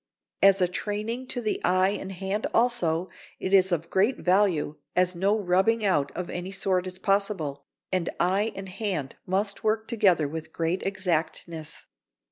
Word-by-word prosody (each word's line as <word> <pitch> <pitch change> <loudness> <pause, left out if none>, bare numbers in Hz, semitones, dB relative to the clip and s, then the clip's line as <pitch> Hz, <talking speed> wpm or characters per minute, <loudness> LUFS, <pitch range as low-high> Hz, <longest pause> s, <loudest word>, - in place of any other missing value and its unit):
As 195 0 +6
a 180 - +4
training 215 +7 -3
to 245 - -2
the 215 -2 -1
eye 185 +1 +3
and 195 -1 -4
hand 195 +3 -2
also, 185 -8 +1 0.3
it 190 - -3
is 190 -1 +6
of 165 -1 -1
great 210 +7 +2
value, 180 -6 +2 0.2
as 180 0 +3
no 195 +5 +1
rubbing 200 +4 +2
out 145 -8 +2
of 180 -1 -3
any 180 +2 -5
sort 185 -1 0
is 185 0 -6
possible, 190 -8 -1 0.3
and 185 -2 0
eye 195 +5 +2
and 195 0 -6
hand 185 -7 -3
must 200 +2 0
work 220 0 +1
together 195 - +3
with 160 +2 -6
great 165 +3 -1
exactness. 170 -4 -2
190 Hz, 160 wpm, -26 LUFS, 175-205 Hz, 0.3 s, As